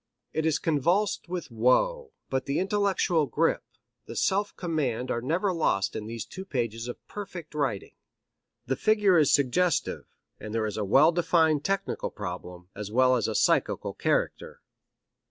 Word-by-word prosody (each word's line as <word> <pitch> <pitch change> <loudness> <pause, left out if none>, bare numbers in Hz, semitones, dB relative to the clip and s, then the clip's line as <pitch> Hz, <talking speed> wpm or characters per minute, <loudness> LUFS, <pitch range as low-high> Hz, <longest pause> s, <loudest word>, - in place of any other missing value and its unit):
It 160 0 0
is 160 - +2
convulsed 170 +6 0
with 180 -7 -5
woe, 430 - +2 0.2
but 130 0 -1
the 140 - 0
intellectual 195 -5 +1
grip, - - +1 0.5
the - - -8
self 200 +2 +1
command 135 -8 -2
are 120 - -1
never 175 - 0
lost 100 - 0
in 105 - -5
these 115 -1 -5
two 190 - -8
pages 115 - -3
of 120 - -8
perfect 185 -6 -8
writing. 135 -10 -2 0.7
The 135 - 0
figure 210 -3 +3
is 150 - +4
suggestive, 145 +5 +1 0.3
and 105 +1 -6
there 110 -1 +1
is 105 -1 -3
a 105 - -1
well 135 - +5
defined 160 -3 +2
technical 195 0 -2
problem, 90 -2 -7
as 105 0 -6
well 130 +2 +4
as 115 -4 0
a 110 - -3
psychical - - +1
character. - - -2
150 Hz, 155 wpm, -27 LUFS, 115-180 Hz, 0.7 s, well